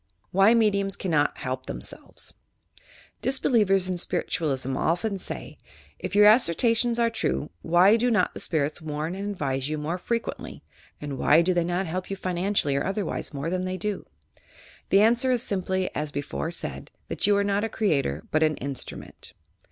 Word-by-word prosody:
L - - -47
YOUR - - -44
PSYCHIC - - -43
POWERS - - +8
WHY 225 - +7
MEDIUMS 200 -3 +1
CANNOT 155 -6 +1
HELP 130 0 -4
THEMSELVES - - -5 0.9
Disbelievers 210 -8 +2
in 185 - -1
BpiritualLsm 145 -7 -1
often 190 +4 0
say: - - -7 0.4
"If - - -4
your 210 0 +7
as 220 +4 +7
sertions 230 +7 +2
are 230 -1 +2
true, 65 - -2
why 180 +6 +5
do 245 +2 +1
not 225 - +2
the - - -7
spirits 155 -3 -1
warn 155 +2 -3
and 200 +2 -4
advise 135 -7 -2
you 155 - -2
more 160 +4 -3
frequently, 230 +5 -4 0.4
and 145 -3 -5
why 160 +3 +5
do 185 +2 +2
they 175 -1 +2
not 175 +2 -1
help 185 +2 -4
you 195 - -3
finan 185 +2 -2
cially 140 -7 +1
or - - -1
otherwise, 195 +1 -2
more 145 +3 -4
than 185 0 -1
they 185 0 -3
dot" 205 +2 -4 0.8
The 195 - +5
answer 235 +4 +4
is 245 -2 +1
simply, 185 -1 -1
as 150 0 -2
before 145 +3 -3
said, 170 - -6 0.2
that - - -1
you 205 -1 +4
are 200 - +2
not 200 +1 0
a 225 - -1
creator, 140 - 0
but 155 - +2
an 155 -1 +3
instrument. 140 0 -6
185 Hz, 190 wpm, -26 LUFS, 155-205 Hz, 0.9 s, POWERS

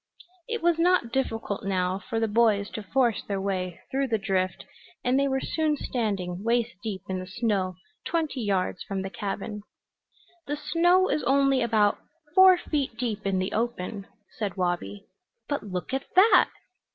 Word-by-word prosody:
It 465 -4 -3
was 340 -1 +3
not 350 -8 +3
difficult 225 -6 -2
now 185 -1 0
for 225 +1 -3
the 225 - +1
boys 210 -2 +2
to 215 - -5
force 235 +2 +1
their 200 -1 -3
way 185 -2 -3
through 270 +1 0
the 225 -3 +1
drift 190 -2 -1 0.4
and 255 +2 +3
they 280 - +2
were 265 -1 0
soon 310 +1 0
standing 200 -8 -2
waist 235 0 +1
deep 210 -5 -5
in 190 -1 -2
the 185 - -7
snow 190 -3 -1 0.3
twenty 315 -6 -1
yards 195 -4 0
from 195 -1 -3
the 190 - -5
cabin. 210 +1 -4 0.9
"The 295 +1 -2
snow 345 +5 +3
is 305 - 0
only 275 0 +3
about 215 -3 +2 0.3
four 375 0 +8
feet 280 -9 -2
deep 220 -4 -2
in 195 -1 +1
the 185 +1 -1
open," 210 -3 -3 0.3
said 205 -2 -2
Wabi. 175 - -2 0.4
"But 285 -6 -2
look 185 +4 -4
at 270 0 -1
that!" 400 +5 +6
225 Hz, 165 wpm, -27 LUFS, 195-270 Hz, 0.9 s, four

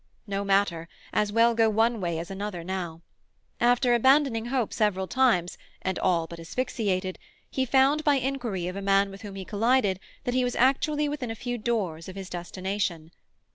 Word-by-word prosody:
No 200 -1 -2
matter; 195 -4 +1 0.2
as 210 -1 +1
well 230 +2 +4
go 225 -1 +3
one 225 +1 +2
way 170 -2 -1
as 170 +4 -5
another 195 -3 -4
now. 170 -2 -5 0.6
After 245 +1 +3
abandoning 260 -1 +3
hope 245 -3 -1
several 200 -3 +1
times, 205 -7 +1 0.2
and 190 -1 -1
all 170 -2 +2
but 170 +1 -10
asphyxiated, 185 -1 -2 0.3
he 265 - 0
found 275 +4 +4
by 295 -2 +4
inquiry 250 -9 -2
of 180 +1 -4
a 200 - -4
man 195 0 +3
with 195 - -11
whom 205 -2 -8
he 190 -1 -6
collided 210 -2 +2 0.2
that 245 - -2
he 255 0 +2
was 245 0 -1
actually 295 +4 +2
within 285 -5 -3
a 225 - -3
few 245 +1 -4
doors 195 -8 -2
of 185 - -9
his 190 -1 -7
destination. 175 -2 -3
205 Hz, 180 wpm, -27 LUFS, 185-245 Hz, 0.6 s, well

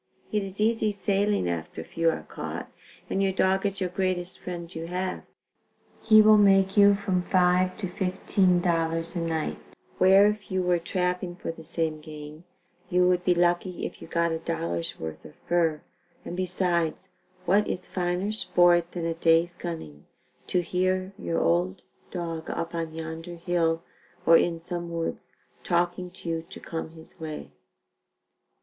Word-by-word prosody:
It 210 - +1
is 195 0 -7
easy 220 0 +2
sailing 200 - +1
after 80 -1 -4
a - - -7
few 165 - +1
are 160 - -3
caught, - - -6 0.4
and 195 - -1
your 195 -1 +2
dog 190 +1 +2
is 195 0 -4
your 185 -2 -1
greatest 185 -1 -2
friend 175 -1 -7
you 165 +1 -5
have. 185 +1 -3 0.8
He 215 -1 +7
will 215 0 +7
make 195 -1 +5
you 200 -1 +7
from 195 -3 0
$5.00 180 0 +2
to 215 - -3
$15.00 175 -3 +1
a - - 0
night, 165 -2 -2 0.4
where 190 +2 +7
if 210 0 0
you 185 -1 0
were 180 -1 +2
trapping 180 0 -2
for 175 - -4
the 165 0 -12
same 160 -1 -2
game, 150 +1 -10 0.4
you 180 0 +4
would 180 0 +2
be 180 -1 +3
lucky 175 +1 +1
if - - -7
you - - -9
got 170 0 +1
a 160 - -2
dollar's 85 - -3
worth 80 -1 -6
of - - -13
fur, 165 -3 +1 0.4
and 175 - -5
besides 180 -1 -1 0.3
what 200 +4 +3
is - - -3
finer 180 +2 -1
sport 175 -5 +3
than 170 -2 -3
a 165 - 0
day's 165 +1 +3
gunning, 80 - -7 0.4
to 180 - +1
hear 185 +2 0
your 165 - -1
old 175 +2 +1 0.3
dog 165 -3 -4
up 165 0 -3
on 165 -1 -3
yonder 165 +2 -6
hill 170 -1 0 0.4
or 165 - +7
in 165 0 +3
some 170 0 -5
woods 165 -1 -4 0.3
talking 175 +1 0
to 175 -1 -13
you 165 -1 -1
to - - -9
come 165 -1 -5
his 160 0 -16
way?" 155 -1 -6
175 Hz, 165 wpm, -27 LUFS, 165-185 Hz, 0.8 s, He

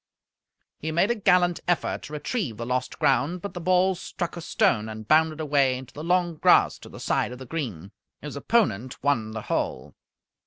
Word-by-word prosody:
He 160 - -3
made 175 +7 +2
a - - +4
gallant 180 -5 +3
effort 175 -4 0
to 150 - -10
retrieve 150 - -3
the 115 - -4
lost 125 +1 -2
ground, 140 +7 +2
but 200 +3 -6
the 175 - -6
ball 185 +2 +3
struck 175 -1 -5
a 170 - -6
stone 110 -8 +1
and 110 -1 -8
bounded 155 0 +3
away 140 -4 +2
into 130 -1 -11
the 150 - -7
long 175 -1 +1
grass - - +4
to - - -12
the - - -11
side - - 0
of 125 - -7
the 130 - -9
green. 110 - -5 0.3
His 150 0 -7
opponent 135 - 0
won 120 -7 +1
the 110 0 -6
hole. - - -2
150 Hz, 195 wpm, -25 LUFS, 125-175 Hz, 0.3 s, a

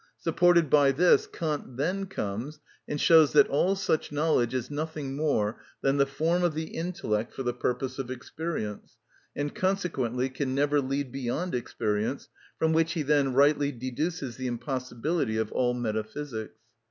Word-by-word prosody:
Supported 170 0 +3
by 140 0 +5
this, 175 +6 +4
Kant 150 -6 -4
then 185 +7 -1
comes 130 - -4 0.3
and 145 - -3
shows 160 -2 +6
that - - +7
all 180 +7 +2
such 190 -6 -1
knowledge 145 -5 +2
is 130 +1 -3
nothing 150 -2 -4
more 125 -8 0 0.2
than 135 +1 +2
the 140 -1 +3
form 165 +6 0
of 170 -3 +1
the 160 0 -4
intellect 165 - -2
for 135 - -4
the 120 -1 -1
purpose 125 +2 -2
of 130 -2 -4
experience, 130 -4 -5 0.4
and 145 0 -2
consequently 140 - 0
can 130 0 -3
never 145 +1 +2
lead 135 0 -2
beyond 135 +7 -3
experience, 110 0 -2 0.3
from 160 0 +2
which 165 0 +2
he 165 -4 -1
then 140 -2 +2
rightly 145 +1 +4
deduces 130 +2 -3
the 130 -1 -3
impossibility 130 +1 -2
of 110 -1 -1
all 125 -1 +1
metaphysics. 110 +1 -4
140 Hz, 155 wpm, -28 LUFS, 125-160 Hz, 0.4 s, that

